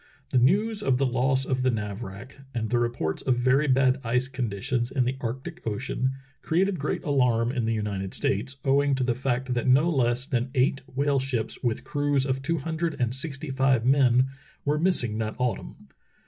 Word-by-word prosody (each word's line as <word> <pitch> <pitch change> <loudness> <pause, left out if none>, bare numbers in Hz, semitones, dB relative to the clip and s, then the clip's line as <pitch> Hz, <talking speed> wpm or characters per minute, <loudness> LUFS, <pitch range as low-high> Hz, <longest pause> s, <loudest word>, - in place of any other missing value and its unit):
The 130 - +4
news 205 - +2
of 135 -11 +2
the 135 - +2
loss 130 +1 +1
of 130 -1 -1
the 130 - +2
Navrach 105 +2 -5 0.2
and 110 -1 -2
the 120 - +3
reports 120 -10 -1
of 130 - +1
very 130 +4 +2
bad 130 0 +3
ice 125 +2 +1
conditions 120 -1 -2
in 130 -2 0
the 130 +2 -1
Arctic 135 +9 -5
Ocean 130 +4 -1 0.3
created 185 +2 +1
great 145 - -2
alarm 125 -5 +2
in 125 -4 -1
the 115 - +1
United 100 -3 -3
States, 130 +8 -1
owing 140 +1 +3
to 130 - 0
the 125 -1 +1
fact 130 0 -1
that 120 +1 -1
no 140 +7 +4
less 125 -3 +1
than 130 -3 -1
eight 135 +1 +2
whale 140 0 +2
ships 130 -4 -3
with 120 -3 -1
crews 145 -2 0
of 135 -1 -1
two 165 +5 0
hundred 160 +2 -2
and 120 -1 0
sixty 140 +1 -3
five 130 -3 +2
men 130 -2 +4 0.4
were 150 +1 +1
missing 125 - +1
that 110 -1 -2
autumn. 125 -2 -3
130 Hz, 190 wpm, -26 LUFS, 120-140 Hz, 0.4 s, The